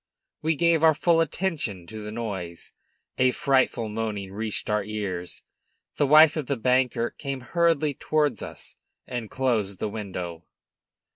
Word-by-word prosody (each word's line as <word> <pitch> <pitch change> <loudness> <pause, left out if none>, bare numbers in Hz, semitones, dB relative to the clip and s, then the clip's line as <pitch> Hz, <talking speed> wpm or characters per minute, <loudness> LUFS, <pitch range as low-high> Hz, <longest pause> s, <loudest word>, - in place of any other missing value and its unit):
We 160 +1 +1
gave 170 0 +3
our 160 -1 +6
full 165 +1 +3
attention 155 - -2
to 110 +4 -8
the 105 - -6
noise; 95 -7 -5 0.5
a 130 0 +5
frightful 130 -3 +1
moaning 105 -3 -4
reached 110 +1 -3
our 105 -1 +1
ears. 100 -4 -5 0.5
The 145 - +3
wife 155 +2 +8
of 155 -5 -3
the 140 - -1
banker 125 -1 +1
came 140 -2 -5
hurriedly 160 +1 +2
towards 150 -4 0
us - - -9 0.3
and 120 -4 -5
closed 110 -7 0
the 105 - -2
window. 90 -6 -6
120 Hz, 145 wpm, -26 LUFS, 105-150 Hz, 0.5 s, wife